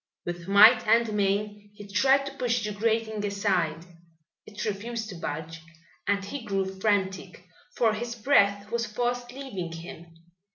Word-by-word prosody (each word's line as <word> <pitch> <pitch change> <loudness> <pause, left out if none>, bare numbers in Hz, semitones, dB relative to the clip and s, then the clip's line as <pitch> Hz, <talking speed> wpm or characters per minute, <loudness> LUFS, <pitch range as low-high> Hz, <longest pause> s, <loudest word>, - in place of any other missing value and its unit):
With 175 0 -5
might 215 +4 +7
and 230 0 +3
main 205 +1 -1
he 205 -1 -11
tried 265 +8 +3
to 275 - -6
push 240 -2 -1
the 210 - -2
grating 220 0 -1
aside. 190 -6 -1 0.6
It 210 0 -6
refused 220 +2 -4
to 190 - -7
budge, 160 0 -6 0.5
and 200 -1 +1
he 270 +5 -6
grew 195 -3 -1
frantic, 190 -3 -1 0.3
for 225 -3 +3
his 235 +2 -4
breath 205 -4 +2
was 235 0 -1
fast 245 +2 -2
leaving 235 -11 -6
him. 165 0 -9
205 Hz, 150 wpm, -27 LUFS, 195-230 Hz, 0.6 s, might